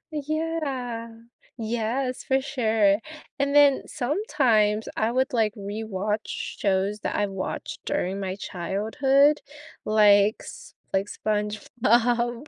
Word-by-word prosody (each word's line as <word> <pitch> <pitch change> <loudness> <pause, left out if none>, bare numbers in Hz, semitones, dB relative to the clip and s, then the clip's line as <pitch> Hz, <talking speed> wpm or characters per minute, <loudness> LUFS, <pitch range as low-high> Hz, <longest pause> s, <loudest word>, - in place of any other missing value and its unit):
Yeah 290 -6 -3 0.5
Yes, 235 +3 -2
for 265 0 +1
sure, 220 -7 +2 0.4
and 280 0 +1
then 285 -2 +6
sometimes, 245 - +1
I 220 +1 +1
would, 260 +4 0
like, 220 -3 +2
rewatch 210 0 -3
shows 200 +1 -1
that - - -2
I 205 - +1
watched 195 -1 -5
during 190 +2 -1
my 190 -1 -3
childhood, 225 - +1 0.4
like 210 -1 +5
S - - -11 0.2
like, 195 +1 +1
SpongeBob. 235 +4 0
225 Hz, 105 wpm, -25 LUFS, 210-270 Hz, 0.5 s, then